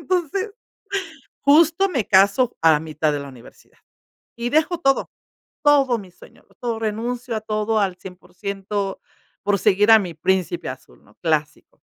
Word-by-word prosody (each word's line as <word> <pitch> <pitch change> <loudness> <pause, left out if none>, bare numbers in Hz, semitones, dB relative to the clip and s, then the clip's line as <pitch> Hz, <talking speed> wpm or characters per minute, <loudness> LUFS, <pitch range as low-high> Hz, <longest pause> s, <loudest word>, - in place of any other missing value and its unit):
Entonces, 370 +5 -1 0.9
justo 325 +6 +4
me 245 - -1
caso 200 +6 +4
a 165 -1 +6
la 150 - +2
mitad 155 -1 -1
de 145 - -2
la 140 - -8
universidad, 125 -3 -16 0.6
y 235 +1 -2
dejo 320 +3 +2
todo 275 -4 +1 0.5
todo 275 -5 +4
mi 190 -4 -11
sueño, - - -18 0.2
todo, 235 -2 -2
renuncio 235 +2 -3
a - - -5
todo 215 0 -1
al 190 -3 0 0.2
100% 200 +1 -5 0.5
por 205 -1 +2
seguir 210 +1 +4
a 220 - +9
mi 180 -4 -5
príncipe 190 - -1
azul, - - -11
¿no?, - - -23
clásico. 155 -2 -2
215 Hz, 150 wpm, -22 LUFS, 190-270 Hz, 0.9 s, a